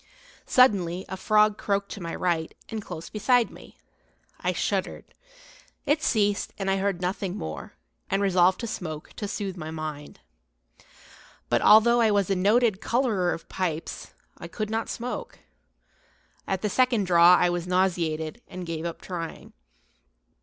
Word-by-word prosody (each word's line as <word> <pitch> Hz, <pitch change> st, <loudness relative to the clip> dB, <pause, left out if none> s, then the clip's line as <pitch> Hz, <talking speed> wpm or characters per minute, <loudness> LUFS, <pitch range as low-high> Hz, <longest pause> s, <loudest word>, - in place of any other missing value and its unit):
Suddenly 190 Hz, -8 st, +3 dB
a 190 Hz, -, -4 dB
frog 210 Hz, +2 st, +3 dB
croaked 200 Hz, 0 st, -1 dB
to 200 Hz, -, -7 dB
my 165 Hz, -1 st, -4 dB
right, 170 Hz, -3 st, -1 dB
and 220 Hz, -1 st, -4 dB
close 170 Hz, -5 st, -8 dB
beside 240 Hz, +2 st, +2 dB
me. -, -, -15 dB, 0.6 s
I -, -, 0 dB
shuddered. -, -, -2 dB, 0.8 s
It 300 Hz, +1 st, +2 dB
ceased, 205 Hz, -7 st, +1 dB
and 195 Hz, -1 st, -1 dB
I 195 Hz, -, +1 dB
heard 195 Hz, -2 st, -1 dB
nothing 185 Hz, 0 st, -2 dB
more, 80 Hz, 0 st, -6 dB, 0.4 s
and 195 Hz, -, +1 dB
resolved 185 Hz, -2 st, +3 dB
to -, -, -3 dB
smoke, 155 Hz, -8 st, -6 dB
to 205 Hz, -, -3 dB
soothe 195 Hz, -2 st, -4 dB
my 155 Hz, -2 st, -6 dB
mind. 155 Hz, -2 st, -6 dB, 1.3 s
But, -, -, +2 dB
although 235 Hz, +3 st, +6 dB
I 225 Hz, -, +4 dB
was 200 Hz, -2 st, +1 dB
a -, -, +3 dB
noted 210 Hz, +2 st, +2 dB
colorer 225 Hz, -8 st, +1 dB
of 165 Hz, -, -6 dB
pipes, 170 Hz, -4 st, -4 dB, 0.2 s
I -, -, -7 dB
could 215 Hz, -1 st, -4 dB
not 225 Hz, +1 st, -2 dB
smoke; 250 Hz, -, -5 dB, 1.1 s
at 190 Hz, 0 st, -2 dB
the 210 Hz, -, +1 dB
second 250 Hz, -3 st, +2 dB
draw 175 Hz, -1 st, +6 dB
I 180 Hz, 0 st, +3 dB
was 175 Hz, 0 st, -3 dB
nauseated, 175 Hz, 0 st, 0 dB
and 185 Hz, -2 st, -7 dB
gave 165 Hz, -1 st, -4 dB
up 170 Hz, -, -5 dB
trying. 170 Hz, -3 st, -6 dB
190 Hz, 155 wpm, -26 LUFS, 175-215 Hz, 1.3 s, although